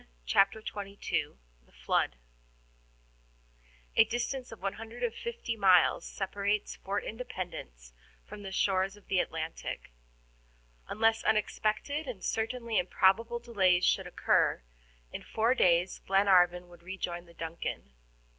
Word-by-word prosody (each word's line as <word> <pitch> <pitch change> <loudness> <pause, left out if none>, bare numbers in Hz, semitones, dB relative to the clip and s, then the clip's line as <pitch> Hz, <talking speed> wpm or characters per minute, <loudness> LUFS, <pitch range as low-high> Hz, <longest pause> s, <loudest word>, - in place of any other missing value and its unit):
CHAPTER 195 - +3
XXII 200 -1 -3 0.3
THE - - -27
FLOOD - - 0 1.8
A - - +8
DISTANCE 245 +2 -3
of 225 - -10
150 230 - -4
miles 185 -4 +4
separates 200 +1 -2
Fort 195 +1 -3
Independence 180 - -7 0.3
from 205 - -10
the 195 -1 -7
shores 190 +1 +1
of 205 - -19
the 190 - +2
Atlantic. 160 - -4 1.0
Unless 225 +1 +2
unexpected 220 +7 0
and 225 -7 -6
certainly 230 0 -1
improbable 205 +6 +2
delays 195 -7 +2
should - - +2
occur, - - +2 0.5
in - - -5
four 225 +3 +1
days 180 -6 +3
Glenarvan 180 -2 +3
would 175 -1 -16
rejoin 175 -1 -5
the 170 - -17
DUNCAN. 165 - -5
200 Hz, 110 wpm, -31 LUFS, 180-225 Hz, 1.8 s, A